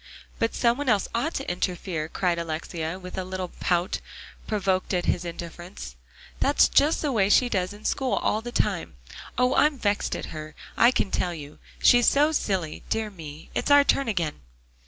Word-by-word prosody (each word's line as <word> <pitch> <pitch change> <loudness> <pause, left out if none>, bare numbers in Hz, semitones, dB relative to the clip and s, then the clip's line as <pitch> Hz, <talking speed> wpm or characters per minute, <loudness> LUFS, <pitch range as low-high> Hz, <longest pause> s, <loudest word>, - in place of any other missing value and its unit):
"But 230 - 0
some 235 +2 +2
one 290 -3 -1
else 205 -4 +2
ought 280 +9 -1
to 270 - -3
interfere," 175 -3 -2
cried 175 -2 0
Alexia, 165 +1 -4
with 180 0 -7
a - - -2
little 185 0 -4
pout, 175 0 0 0.5
provoked 195 -3 0
at 175 - -1
his 175 - +1
indifference; 170 - -8 0.4
"that's - - +4
just 300 +3 +3
the 295 - +1
way 200 -5 +2
she 245 +4 +5
does 185 -4 0
in 210 +1 -12
school 265 -2 0
all 215 - +1
the 240 +1 -6
time. - - -1 0.4
Oh! 250 +1 +3
I'm 300 -1 +3
vexed 205 -4 0
at - - -6
her, 155 -1 -8 0.2
I 235 - +6
can 205 -6 0
tell 175 -1 -1
you. 150 -1 -10 0.2
She's 245 -1 +6
so 295 +2 +4
silly 190 - -1
dear 220 -1 -1
me, 155 -4 -10
it's - - -1
our 285 0 +7
turn 275 -1 +2
again." 170 - -2
190 Hz, 185 wpm, -26 LUFS, 170-240 Hz, 0.5 s, our